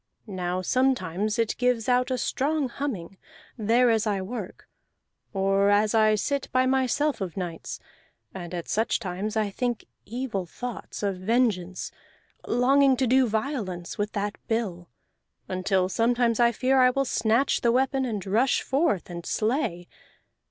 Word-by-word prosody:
Now 185 Hz, -3 st, -3 dB
sometimes 215 Hz, -5 st, 0 dB
it 230 Hz, -2 st, 0 dB
gives 245 Hz, -3 st, +1 dB
out 250 Hz, 0 st, +2 dB
a 255 Hz, -, 0 dB
strong 280 Hz, +2 st, 0 dB
humming, 205 Hz, -10 st, -5 dB, 0.4 s
there 235 Hz, +2 st, +3 dB
as 225 Hz, -1 st, +1 dB
I 205 Hz, -2 st, 0 dB
work, 195 Hz, 0 st, -7 dB, 0.6 s
or 195 Hz, 0 st, +2 dB
as 205 Hz, +1 st, +3 dB
I 215 Hz, -1 st, +4 dB
sit 280 Hz, +6 st, -2 dB
by 255 Hz, 0 st, +3 dB
myself 265 Hz, +1 st, +1 dB
of 185 Hz, -1 st, -4 dB
nights; 175 Hz, -3 st, -5 dB, 0.5 s
and 175 Hz, -3 st, -7 dB
at 175 Hz, -2 st, -5 dB
such 220 Hz, +2 st, +1 dB
times 205 Hz, +1 st, -3 dB
I 210 Hz, -2 st, 0 dB
think 240 Hz, 0 st, -2 dB, 0.2 s
evil 225 Hz, -6 st, -4 dB
thoughts 245 Hz, +3 st, -7 dB
of 195 Hz, -2 st, 0 dB
vengeance, 190 Hz, -3 st, 0 dB, 0.6 s
longing 265 Hz, +2 st, +4 dB
to 260 Hz, -, +2 dB
do 255 Hz, +1 st, +4 dB
violence 215 Hz, -, -3 dB
with 205 Hz, 0 st, -1 dB
the 205 Hz, 0 st, -1 dB, 0.2 s
bill, 195 Hz, -7 st, -2 dB, 0.6 s
until 185 Hz, 0 st, +1 dB
sometimes 235 Hz, +3 st, +1 dB
I 235 Hz, 0 st, +5 dB
fear 260 Hz, +3 st, +2 dB
I 255 Hz, 0 st, +6 dB
will 275 Hz, +2 st, 0 dB
snatch 235 Hz, +2 st, +1 dB
the 235 Hz, -, +3 dB
weapon 265 Hz, +2 st, +1 dB
and 215 Hz, -7 st, -3 dB
rush 225 Hz, +7 st, +2 dB
forth 275 Hz, -, +1 dB
and 170 Hz, -1 st, -7 dB
slay. 215 Hz, -, -1 dB
225 Hz, 150 wpm, -26 LUFS, 195-255 Hz, 0.6 s, I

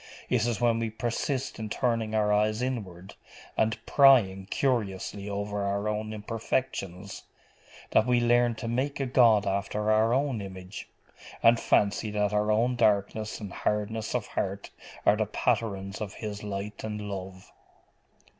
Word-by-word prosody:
It 120 Hz, -2 st, +2 dB
is 120 Hz, -3 st, -1 dB
when 115 Hz, -1 st, +2 dB
we 115 Hz, -1 st, -1 dB
persist 120 Hz, +4 st, -3 dB
in 110 Hz, -1 st, -4 dB
turning 115 Hz, -2 st, -1 dB
our 105 Hz, -1 st, +2 dB
eyes 110 Hz, +3 st, +1 dB
inward, 100 Hz, -7 st, -5 dB, 0.4 s
and 110 Hz, 0 st, +1 dB
prying 110 Hz, -9 st, +5 dB
curiously 105 Hz, -5 st, -1 dB
over 100 Hz, 0 st, -3 dB
our 100 Hz, +1 st, -1 dB
own 105 Hz, 0 st, -2 dB
imperfections, 105 Hz, -3 st, -3 dB, 0.7 s
that 110 Hz, -, +4 dB
we 125 Hz, -1 st, +3 dB
learn 120 Hz, 0 st, +3 dB
to 115 Hz, -, -6 dB
make 130 Hz, +5 st, -1 dB
a 135 Hz, -, 0 dB
God 115 Hz, -5 st, +4 dB
after 100 Hz, +2 st, -1 dB
our 110 Hz, +1 st, +3 dB
own 130 Hz, -3 st, 0 dB
image, 95 Hz, 0 st, -8 dB, 0.5 s
and 115 Hz, 0 st, +6 dB
fancy 100 Hz, +1 st, +2 dB
that 105 Hz, 0 st, 0 dB
our 105 Hz, +1 st, +2 dB
own 120 Hz, +4 st, +2 dB
darkness 110 Hz, -1 st, +1 dB
and 100 Hz, -3 st, -7 dB
hardness 105 Hz, +2 st, -2 dB
of 120 Hz, -4 st, -1 dB
heart 100 Hz, +1 st, -4 dB, 0.3 s
are 105 Hz, -, +5 dB
the 110 Hz, -1 st, 0 dB
patterns 105 Hz, -3 st, -1 dB
of 105 Hz, -2 st, -5 dB
His 105 Hz, -2 st, -6 dB
light 105 Hz, 0 st, -5 dB
and 105 Hz, -1 st, -4 dB
love. 95 Hz, -2 st, -7 dB
105 Hz, 150 wpm, -28 LUFS, 100-115 Hz, 0.7 s, and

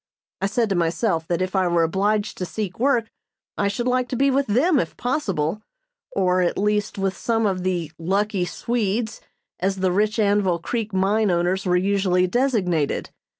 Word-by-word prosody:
I 195 Hz, -, +2 dB
said 230 Hz, +3 st, +1 dB
to 195 Hz, -, 0 dB
myself 165 Hz, 0 st, 0 dB
that 175 Hz, +1 st, 0 dB
if 185 Hz, +2 st, -4 dB
I 190 Hz, -1 st, +3 dB
were 170 Hz, -1 st, +2 dB
obliged 205 Hz, +5 st, 0 dB
to 180 Hz, -, -2 dB
seek 205 Hz, -2 st, -5 dB
work 245 Hz, -3 st, +1 dB, 0.4 s
I 200 Hz, -, 0 dB
should 200 Hz, +4 st, -2 dB
like 255 Hz, 0 st, +1 dB
to -, -, -2 dB
be 275 Hz, +3 st, +3 dB
with 275 Hz, +1 st, +1 dB
them 275 Hz, -, +3 dB
if -, -, -3 dB
possible; 210 Hz, -, -1 dB, 0.5 s
or, 185 Hz, -1 st, +2 dB
at 175 Hz, -, 0 dB
least, 210 Hz, +1 st, 0 dB
with 195 Hz, -1 st, -1 dB
some 225 Hz, +4 st, 0 dB
of 190 Hz, -3 st, 0 dB
the 175 Hz, -4 st, -2 dB
"lucky 195 Hz, +2 st, 0 dB
Swedes," 220 Hz, +1 st, -2 dB, 0.4 s
as 190 Hz, +1 st, 0 dB
the 190 Hz, -1 st, 0 dB
rich 210 Hz, +4 st, +1 dB
Anvil 200 Hz, -4 st, +2 dB
Creek 220 Hz, +5 st, -3 dB
mine 200 Hz, +3 st, +2 dB
owners 180 Hz, +2 st, 0 dB
were 180 Hz, 0 st, +3 dB
usually 190 Hz, -1 st, +2 dB
designated. 185 Hz, -, 0 dB
195 Hz, 180 wpm, -23 LUFS, 180-220 Hz, 0.5 s, I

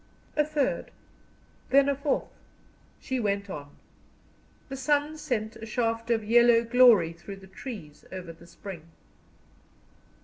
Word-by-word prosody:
A 300 Hz, -, +4 dB
third 300 Hz, -2 st, -1 dB, 0.8 s
then 275 Hz, +1 st, +5 dB
a 280 Hz, -, +2 dB
fourth 280 Hz, +1 st, -1 dB, 0.7 s
she 260 Hz, -1 st, -3 dB
went 200 Hz, -3 st, -1 dB
on; 145 Hz, -3 st, -8 dB, 0.9 s
the 270 Hz, -, -6 dB
sun 290 Hz, +3 st, +1 dB
sent 230 Hz, -8 st, -3 dB
a 225 Hz, -, -8 dB
shaft 230 Hz, 0 st, -1 dB
of 225 Hz, -2 st, +2 dB
yellow 235 Hz, +1 st, +5 dB
glory 230 Hz, -8 st, +6 dB
through 175 Hz, +4 st, -9 dB
the 195 Hz, -, -14 dB
trees 190 Hz, -, -9 dB
over 185 Hz, -3 st, -7 dB
the 170 Hz, +1 st, -17 dB
spring. 175 Hz, -3 st, -9 dB
230 Hz, 130 wpm, -28 LUFS, 190-260 Hz, 0.9 s, glory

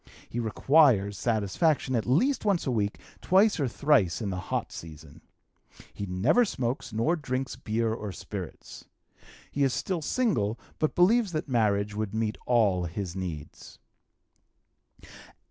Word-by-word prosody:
He 120 Hz, -, -4 dB
requires 115 Hz, -3 st, +3 dB
satisfaction 120 Hz, -, 0 dB
at 115 Hz, -, -1 dB
least 235 Hz, -, +2 dB
once 200 Hz, -5 st, +1 dB
a 135 Hz, -, 0 dB
week, 105 Hz, -3 st, -1 dB, 0.2 s
twice 195 Hz, +1 st, +4 dB
or 140 Hz, -, +1 dB
thrice 120 Hz, -, +2 dB
in 105 Hz, -4 st, -3 dB
the 95 Hz, -, -3 dB
hot -, -, -2 dB
season. 80 Hz, -1 st, -11 dB, 0.7 s
He 100 Hz, -, -5 dB
never 105 Hz, -, +3 dB
smokes, 130 Hz, -, -3 dB
nor 115 Hz, +11 st, +1 dB
drinks 130 Hz, -4 st, -3 dB
beer 110 Hz, 0 st, -1 dB
or 105 Hz, -3 st, -5 dB
spirits. -, -, -8 dB, 0.7 s
He 140 Hz, -, 0 dB
is 135 Hz, -2 st, +2 dB
still 185 Hz, -4 st, -2 dB
single, 120 Hz, -, 0 dB, 0.2 s
but 155 Hz, -, 0 dB
believes 200 Hz, +2 st, +3 dB
that 155 Hz, -, -2 dB
marriage 105 Hz, -5 st, +1 dB
would 105 Hz, 0 st, -3 dB
meet 110 Hz, -1 st, -1 dB
all 105 Hz, -7 st, +3 dB
his 90 Hz, +1 st, -5 dB
needs. 85 Hz, -6 st, -7 dB
115 Hz, 140 wpm, -28 LUFS, 100-150 Hz, 0.7 s, twice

